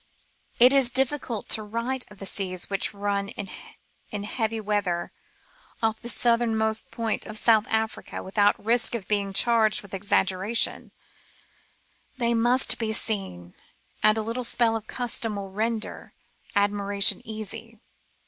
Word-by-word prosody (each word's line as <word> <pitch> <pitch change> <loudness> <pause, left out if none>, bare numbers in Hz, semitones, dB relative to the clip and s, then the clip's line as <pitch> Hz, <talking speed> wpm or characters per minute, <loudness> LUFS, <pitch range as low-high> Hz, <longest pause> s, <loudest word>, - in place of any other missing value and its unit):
It 250 +3 +7
is 270 -3 +4
difficult 255 -3 0
to 220 - +1
write 235 +5 -4
of 205 - -15
the 195 - -7
seas 185 -1 0
which 195 - +2
run 200 -1 -2
in 200 +1 -10
heavy 225 +1 -2
weather 200 -5 -2 0.7
off 220 0 0
the 235 - -5
southernmost 225 -2 +2
point 225 -2 -2
of 215 0 -4
South 220 -1 +3
America 220 0 -3
without 205 +2 +2
risk 235 +1 +4
of 215 -5 -6
being 200 -2 0
charged 220 +1 +3
with 200 - -15
exaggeration; 195 +2 +1 1.3
they 235 -2 +1
must 240 +3 +3
be 225 -2 -2
seen, 190 - -3 0.5
and 215 +1 +4
a 220 - -1
little 230 +3 -3
spell 230 -1 +2
of 220 -1 -5
custom 230 -3 0
will 195 -1 -6
render 220 +2 -4 0.4
admiration 200 0 +1
easy. 220 +1 -7
220 Hz, 135 wpm, -25 LUFS, 200-230 Hz, 1.3 s, It